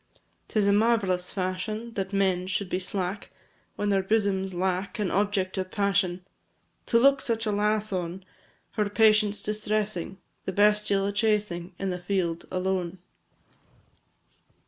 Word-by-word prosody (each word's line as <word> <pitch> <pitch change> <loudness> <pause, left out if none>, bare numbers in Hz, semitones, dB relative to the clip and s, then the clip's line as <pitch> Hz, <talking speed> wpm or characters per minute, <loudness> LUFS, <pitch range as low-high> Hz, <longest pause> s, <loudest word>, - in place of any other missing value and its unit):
'Tis 215 -2 +1
a 200 - +5
marvellous 205 -5 +2
fashion 210 +5 -3
That 195 -2 -3
men 190 -2 +1
should 190 0 -2
be 180 - +1
slack, 190 +1 -3 0.5
When 205 - -1
their 195 -1 +3
bosoms 195 -2 +1
lack 185 +1 -1
An 205 -4 -1
object 195 -1 0
of 185 0 -3
passion, 195 -3 0 0.6
To 230 - +4
look 275 +2 +5
such 225 -1 -1
a 210 - +1
lass 210 0 0
on, 180 +1 -3 0.5
Her 210 -2 0
patience 215 -1 +3
distressing, 210 -3 -2 0.3
The 190 - -3
bestial 205 0 +3
a 200 - 0
chasing, 205 -4 0
In 195 -1 -2
the 180 - -3
field, 180 -2 -1
alone. 185 -1 -1
200 Hz, 140 wpm, -27 LUFS, 185-210 Hz, 0.6 s, a